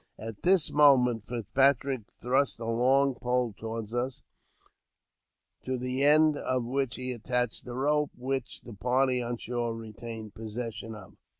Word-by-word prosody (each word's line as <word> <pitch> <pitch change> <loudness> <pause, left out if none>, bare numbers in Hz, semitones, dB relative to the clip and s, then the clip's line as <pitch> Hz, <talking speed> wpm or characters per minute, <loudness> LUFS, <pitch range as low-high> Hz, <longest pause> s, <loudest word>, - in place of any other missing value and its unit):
At 110 -2 -7
this 185 -2 +5
moment 125 -6 +4
Fitzpatrick 130 +1 +1
thrust 130 +3 +1
a 115 - -5
long 130 +4 +3
pole 125 -1 -1
toward 115 0 -6
us, 125 +2 -3 1.4
to 130 0 -2
the 130 +2 -2
end 150 +1 +5
of 130 -3 -1
which 130 -1 -1
he 130 0 -4
attached 125 0 -2
a 120 - -6
rope 150 +2 +1
which 130 0 -4
the 120 - -11
party 125 +4 +1
on 120 0 -3
shore 120 -1 -2
retained 110 -1 -8
possession 115 0 -6
of. 100 -1 -13
125 Hz, 140 wpm, -29 LUFS, 115-135 Hz, 1.4 s, this